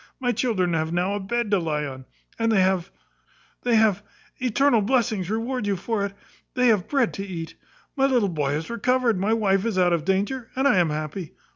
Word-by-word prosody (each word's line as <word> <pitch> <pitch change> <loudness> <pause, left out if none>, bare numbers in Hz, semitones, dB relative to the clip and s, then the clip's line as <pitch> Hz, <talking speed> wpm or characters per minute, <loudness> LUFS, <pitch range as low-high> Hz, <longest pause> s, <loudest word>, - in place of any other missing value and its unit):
My 245 -2 +1
children 210 -7 0
have 160 0 -1
now 180 +3 0
a 205 - -2
bed 215 +2 -2
to 200 - +4
lie 150 -3 -2
on 130 -2 -8 0.3
and 225 0 +2
they 205 -3 +4
have 185 -1 +1 0.7
they 245 -2 +2
have 215 -3 +3 0.4
eternal 255 -1 +3
blessings 215 -5 0
reward 230 +1 -2
you 200 - +1
for 215 +3 -2
it! 200 -1 -3 0.4
they 250 -1 +4
have 210 -5 +2
bread 270 -5 +1
to 195 - -5
eat. 170 -4 -6 0.4
My 270 -1 +3
little 245 -7 +2
boy 145 -5 -1
is 160 +7 -3
recovered; 235 -2 +1
my 205 +4 +1
wife 195 -3 +2
is 225 -4 -1
out 180 -1 +3
of 165 -3 0
danger, 205 +7 -1
and 265 +2 +2
I 210 - +4
am 175 -3 +3
happy. 155 +3 -5
205 Hz, 210 wpm, -24 LUFS, 180-235 Hz, 0.7 s, to